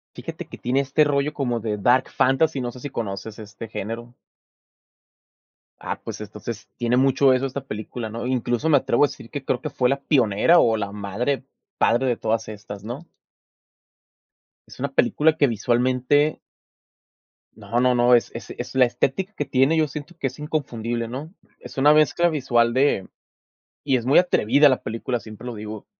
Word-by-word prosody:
Fíjate - - -7
que - - -10
tiene 125 +3 0
este 140 +3 +2
rollo 145 0 0
como 125 -5 -1
de 105 -1 -3
Dark 120 +5 +3
Fantasy, 135 +2 +2
no 120 -1 -3
sé 125 - -12
si 145 - -6
conoces 110 -2 -5
este 105 +1 -9
género. 115 +3 -6 1.7
Ah, - - -5
pues - - -6
entonces, 105 +1 -7
tiene 120 0 0
mucho 135 +1 +4
eso 130 +1 +1
esta 135 0 -4
película, 110 0 -6
¿no? 115 +3 -5
Incluso, 125 +2 -1
me 155 - +5
atrevo 130 +1 +3
a - - 0
decir 115 - -11
que 145 -3 -6
creo 125 - -1
que 150 - -4
fue 125 -3 +1
la 140 +1 0
pionera 135 +4 +4
o 115 - +3
la 100 -2 -3
madre, 105 +7 -2 0.3
padre 120 +3 +2
de 120 -2 +1
todas 110 0 -1
estas, 105 -1 -9
¿no? 120 +9 -7 1.6
Es - - -13
una 140 +1 -4
película 150 +6 +3
que 145 -3 +3
visualmente 125 +6 +1 1.2
No, 110 +2 -2
no, 125 0 +3
no, 120 0 +5
es 120 - +1
es - - -8
es - - -7
la 130 -1 +6
estética 160 - -1
que 145 - -2
tiene, 135 +5 +2
yo 155 -1 +3
siento 150 +4 -8
que 135 - 0
es 130 +3 -9
inconfundible, 120 -7 -3
¿no? 140 +8 -7 0.3
Es - - -12
una 145 +3 +6
mezcla 155 +3 +3
visual 120 -6 +1
de 130 -7 +2 0.8
y 135 -3 +2
es 120 - -3
muy 135 +3 +5
atrevida 145 -5 +4
la 130 - 0
película, 115 +2 -3
siempre 110 +2 -11
lo 120 - -5
digo, 105 0 -8
125 Hz, 180 wpm, -23 LUFS, 115-140 Hz, 1.7 s, la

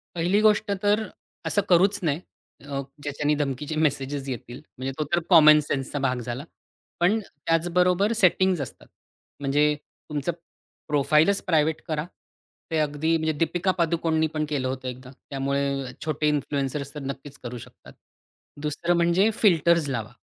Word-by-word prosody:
पहिली 175 +5 +2
गोष्ट 215 0 +3
तर, 210 +1 +2 0.4
असं 205 - +2
करूच 190 +3 +4
नये 155 -2 0 0.5
अ, 140 -1 -3 0.2
ज्याच्याने 145 +1 0
धमकीचे 145 +1 -2
मेसेजेस 140 -2 -1
येतील 125 +1 -6 0.2
म्हणजे 130 +1 -3
तो 155 - 0
तर 175 - +3
कॉमन 155 -3 +8
सेन्सचा 140 0 -3
भाग 130 -2 0
झाला. 120 +3 -5 0.6
पण 185 +6 +3
त्याचबरोबर 180 +4 +1
सेटिंग्ज 185 -4 +3
असतात. 125 - -9 0.5
म्हणजे 145 +2 +2 0.4
तुमचं 150 +3 -1 0.6
प्रोफाइलच 150 +6 +3
प्रायव्हेट 160 -2 +2
करा. 155 -1 -1 0.7
ते 160 - 0
अगदी 155 +2 +1
म्हणजे 160 0 0
दीपिका 170 +4 +1
पादुकोणनी 165 -1 +1
पण 155 - 0
केलं 135 -4 -1
होतं 130 0 -4
एकदा. 125 +1 -8 0.2
त्यामुळे 140 -1 -1
छोटे 150 -1 0
इन्फ्लुएंसर्स 140 -1 -2
तर 150 - -6
नक्कीच 140 +1 -7
करू 120 0 -6
शकतात. - - -14 0.7
दुसरं 170 +4 0
म्हणजे 175 +5 +3
फिल्टर्स 170 -6 +3
लावा. 120 -3 -3
150 Hz, 140 wpm, -25 LUFS, 140-170 Hz, 0.7 s, कॉमन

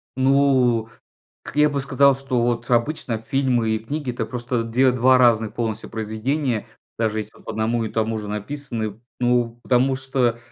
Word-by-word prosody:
Ну, 130 -4 +3 0.6
как - - -10
я 150 0 +5
бы 140 -1 -2
сказал, 135 0 +4
что 135 -3 -1
вот 120 0 -1
обычно 120 -1 0
фильмы 120 -1 0
и 110 - 0
книги- 140 +4 -4
это 120 -2 -3
просто 120 0 -2
две 125 +3 +3
два 130 +1 +4
разных 110 -3 +3
полностью 115 -3 -3
произведения, 110 +3 -2 0.3
даже 110 -1 0
если 105 0 -6
вот - - -19
по - - -4
одному 115 +2 0
и 110 - -3
тому 110 0 -1
же 105 - -7
написаны. 110 -1 -4 0.2
Ну 120 -1 +1
потому 130 +1 +2
что 130 -3 0
120 Hz, 170 wpm, -22 LUFS, 110-130 Hz, 0.6 s, я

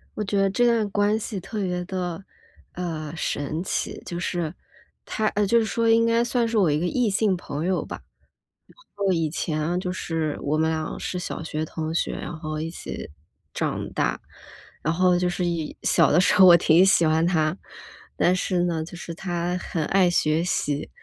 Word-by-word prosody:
我 210 - -2
觉 200 0 -1
得 195 0 +3
这 245 +5 +2
段 230 -3 +2
关 205 +1 +2
系 210 -2 -4
特 200 +3 -5
别 180 -1 -2
的， 180 -1 -4 0.5
呃， 160 -4 -4
神 155 +1 -2
奇。 - - -3
就 175 - -5
是， 175 -3 -2 0.5
他 220 - -1
呃， 205 0 0
就 235 +4 +4
是 225 - +1
说 230 +1 0
应 230 0 +5
该 230 0 +3
算 240 -1 +1
是 225 0 -1
我 185 -7 +4
一 145 - +1
个 170 - -1
异 245 +4 +1
性 200 -1 +2
朋 155 -2 -5
友 185 0 0
吧。 - - -7 1.1
就 - - +4
以 165 -3 0
前 155 +2 -1
就 180 -1 -3
是 165 -4 -2
我 150 +2 0
们 160 0 +2
俩 155 -1 -3
是 180 - -4
小 180 - -5
学 155 -1 -3
同 160 0 -4
学， - - 0
然 175 - -6
后 155 -1 -4
一 160 +1 -3
起 170 - -7 0.4
长 - - -2
大。 - - 0 0.6
然 160 +3 0
后 180 0 +3
就 180 0 +1
是 175 0 -2
以 170 -3 -2
小 - - +4
的 165 - +5
时 185 - +3
候 190 - +8
我 175 -1 +10
挺 170 +1 +5
喜 180 -4 +4
欢 160 +1 +3
他。 160 -1 +1 0.6
但 180 - +3
是 185 -1 0
呢， 165 -2 -1
就 175 - -10
是 170 -1 -7
他 175 0 -2
很 165 -3 -3
爱 190 -2 +4
学 155 -1 +2
习， 145 -5 -1
175 Hz, 215 characters per minute, -24 LUFS, 160-195 Hz, 1.1 s, 我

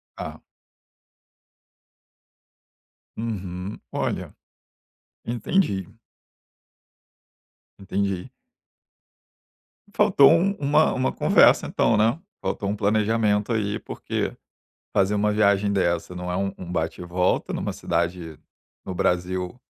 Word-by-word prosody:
Tá. - - -7 2.8
Uhum. 95 -4 -5
Olha, - - -3 0.9
entendi. 120 - 0 1.9
Entendi. 100 -1 -2 1.6
Faltou 190 -10 +6
um 175 +4 +4
uma 145 +2 +3
uma 130 0 0
conversa - - +5
então, - - +2
né, 115 +7 +2 0.2
faltou 100 - -2
um 105 - -1
planejamento 105 +1 +1
aí, 105 -1 -1
porque - - -3 0.6
fazer 100 +2 +3
uma 105 +1 +2
viagem 100 -1 +3
dessa 85 -2 0
não 90 0 -5
é 90 - -1
um 100 0 -1
um 90 - -8
bate 80 -1 -2
e - - -6
volta 90 +1 0
numa - - -2
cidade 85 -1 -2 0.5
no 95 - -5
Brasil 90 +5 -1
100 Hz, 95 wpm, -24 LUFS, 90-110 Hz, 2.8 s, Faltou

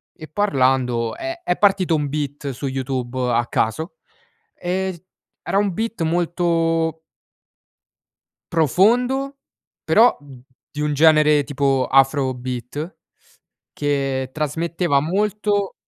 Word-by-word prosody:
e 155 -3 -10
parlando 130 - +1
è 335 +1 -6
è 180 - 0
partito 190 -4 +3
un 150 -2 -1
beat 145 -1 -4
su 135 +2 -5
YouTube 130 -1 -3 0.2
a 120 +1 +2
caso 160 - -2 0.6
e 185 -1 -3 0.4
era - - -1
un 200 -2 +1
flow 225 -6 -2
molto 165 -1 0 1.5
profondo, 245 - +2 0.5
però 235 +3 +5
di 135 +1 -12
un 150 0 0
genere 150 -1 +5
tipo 140 -2 0
afro 135 0 +3
beat 125 +6 -6 0.8
che 135 -3 -1
trasmetteva 160 +1 0
molto 205 +4 0
155 Hz, 100 wpm, -21 LUFS, 135-185 Hz, 1.5 s, però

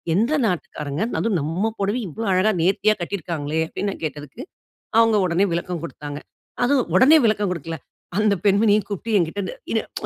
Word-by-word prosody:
எந்த 230 +9 +2
நாட்டுக்காரங்க? 155 -5 -3 0.2
அதுவும் 215 -6 +1
நம் 180 +10 -2
புடவய 205 +5 -1
இவ்ளோ 225 +8 -5
அழகா 185 +4 +3
நேர்த்தியா 200 +4 +3
கட்டியிருக்காங்ளே" 160 -4 -3
அப்டின்னு 200 +3 -3
நான் - - -10
கேட்டதுக்கு, 150 - -7 0.6
அவுங்க 225 -2 +5
உடனே 180 +3 +2
விளக்கம் 170 -1 -3
குடுத்தாங்க. 145 -3 -7 0.5
அதுவும் 260 -1 +1
உடனே 295 +5 +7
விளக்கம் 210 -3 +1
குடுக்கல. 165 -1 -4 0.4
அந்த 210 -1 +3
பெண்மணியையும் 205 0 +3
கூப்பிட்டு 210 +2 -2
என்கிட்ட 175 +4 -1 0.3
என்ன - - +1 0.2
ஒ - - -2
195 Hz, 155 wpm, -22 LUFS, 165-215 Hz, 0.6 s, உடனே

